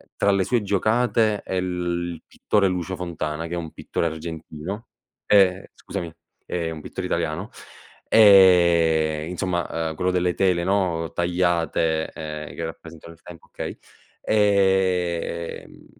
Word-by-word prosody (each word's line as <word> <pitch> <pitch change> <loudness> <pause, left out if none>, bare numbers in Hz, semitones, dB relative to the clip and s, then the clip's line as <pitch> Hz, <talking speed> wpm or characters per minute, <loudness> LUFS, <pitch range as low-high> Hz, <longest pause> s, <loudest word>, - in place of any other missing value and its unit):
tra 100 - +2
le 100 -1 +2
sue 120 +2 +1
giocate 110 +1 +1
e 95 - -1
l 90 -1 -2
il 80 - -10
pittore 100 -2 +1
Lucio 90 0 -2
Fontana, 85 -2 -4
che 85 - -7
è - - -2
un 80 -2 -5
pittore 85 - -3
argentino, 80 +5 -7 0.4
ehm 95 -2 +4
scusami, 85 -2 -6 0.3
è 85 -2 -3
un 80 -1 -7
pittore - - -5
italiano, 85 +9 -2 0.6
ehm, 85 -6 +5
insomma, 90 -1 -2 0.2
uhm, 80 - -6
quello 90 +2 0
delle 90 -1 +1
tele, 90 -3 +1
no, 90 -4 0
tagliate, 85 -2 0
ehm, 75 -1 -7
che 85 - -4
rappresentano 80 0 -10
il 85 - -23
tempo, 85 -3 -13
okay. - - -6 0.5
Ehm, 95 -5 0
85 Hz, 135 wpm, -23 LUFS, 80-95 Hz, 0.6 s, ehm